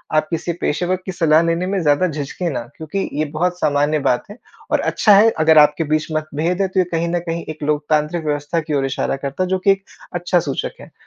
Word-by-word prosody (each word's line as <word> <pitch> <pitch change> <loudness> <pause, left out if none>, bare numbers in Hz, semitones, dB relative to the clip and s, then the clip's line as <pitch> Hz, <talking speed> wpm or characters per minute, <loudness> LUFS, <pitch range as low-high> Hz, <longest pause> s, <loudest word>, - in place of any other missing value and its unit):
आप 155 0 +2
किसी 170 +1 -2
पेशेवर 175 +4 0
की 190 - -3
सलाह 160 -3 +3
लेने 165 +2 0
में 195 0 0
ज़्यादा 150 +4 +3
झिझकें 155 +3 -4
ना, 140 - -3 0.2
क्योंकि 175 +5 -3
ये 155 +2 0
बहुत 175 +3 -1
सामान्य 145 0 +1
बात 125 -3 +1
है। 210 - -11 0.3
और - - +3
अच्छा 210 - +3
है 215 +3 +6
अगर 155 0 +5
आपके 150 +1 +5
बीच 155 0 0
मतभेद 155 +4 -1
है 195 - +2
तो 190 0 -1
ये - - +5
कहीं 165 0 0
न - - +1
कहीं 165 0 -2
एक 155 -1 -7
लोकतांत्रिक 150 +2 0
व्यवस्था 145 +2 -1
की 155 -1 -5
ओर 135 -1 +1
इशारा 135 0 -1
करता 140 +7 -2
है 185 - -3
जो 190 0 +1
कि 195 +2 +4
एक 195 0 -1 0.3
अच्छा 175 +1 +1
सूचक 135 - -4
है। - - -13
160 Hz, 235 wpm, -19 LUFS, 150-180 Hz, 0.3 s, है